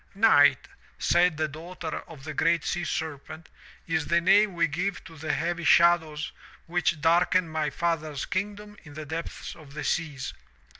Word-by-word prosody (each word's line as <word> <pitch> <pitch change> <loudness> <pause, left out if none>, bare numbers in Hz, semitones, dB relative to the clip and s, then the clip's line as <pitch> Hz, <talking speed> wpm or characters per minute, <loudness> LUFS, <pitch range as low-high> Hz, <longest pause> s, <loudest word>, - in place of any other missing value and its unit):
" - - -29
'Night,' 145 -9 +5 0.3
said 175 -2 +3
the 155 0 0
daughter 160 +2 -6
of 150 -5 -12
the 155 +1 -6
GREAT 165 +1 +2
SEA 175 - -1
SERPENT, 160 0 -5 0.4
*is 160 -2 -1
the 170 - +3
name 195 +2 +4
we 170 -2 +3
give 180 +6 -3
to 165 - -13
the 155 0 -3
heavy 175 +1 -2
shadows 160 -2 +3 0.3
which 170 -2 0
darken 170 +3 +3
my 155 -1 -1
father's 155 -2 -2
kingdom 205 +2 -4
in 145 -2 -13
the 155 0 -6
depths 160 +3 -6
of 150 -4 -15
the - - -4
seas. 145 -5 -2
165 Hz, 165 wpm, -27 LUFS, 155-175 Hz, 0.4 s, Night